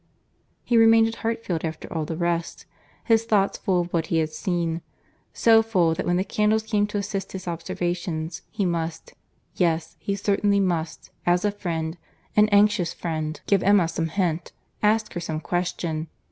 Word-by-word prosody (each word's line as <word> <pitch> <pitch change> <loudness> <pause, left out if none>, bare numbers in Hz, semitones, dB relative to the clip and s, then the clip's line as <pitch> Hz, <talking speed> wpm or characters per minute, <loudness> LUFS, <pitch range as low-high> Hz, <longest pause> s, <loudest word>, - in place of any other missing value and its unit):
He 240 - +2
remained 225 0 +6
at 225 - -7
Hartfield 225 -7 -2
after 160 -1 -4
all 160 -2 -1
the 160 +1 -4
rest, 170 -1 -2 0.4
his 225 -1 +3
thoughts 205 -4 +1
full 185 -2 +1
of 175 0 -6
what 165 -2 0
he 165 - 0
had 160 -1 0
seen; 170 -1 -2 0.5
so 225 -1 +5
full, 185 -7 +2
that - - -3
when 175 - +2
the 185 - +1
candles 215 +2 +1
came 210 -2 +1
to 210 - -3
assist 200 -1 -3
his 185 -1 -7
observations, 170 -1 -3
he 210 -3 -1
must—yes, 165 0 -3
he 200 - -2
certainly 200 0 +2
must, 170 -4 -2 0.2
as 175 +2 +3
a 205 - +2
friend—an 175 +3 -2
anxious 205 -3 +3
friend—give 160 +4 -1
Emma 200 -4 +4
some 165 0 -2
hint, 170 -2 -1 0.3
ask 215 +1 +2
her 175 - -3
some 160 -2 -3
question. 165 -2 -2
180 Hz, 160 wpm, -24 LUFS, 165-205 Hz, 0.5 s, remained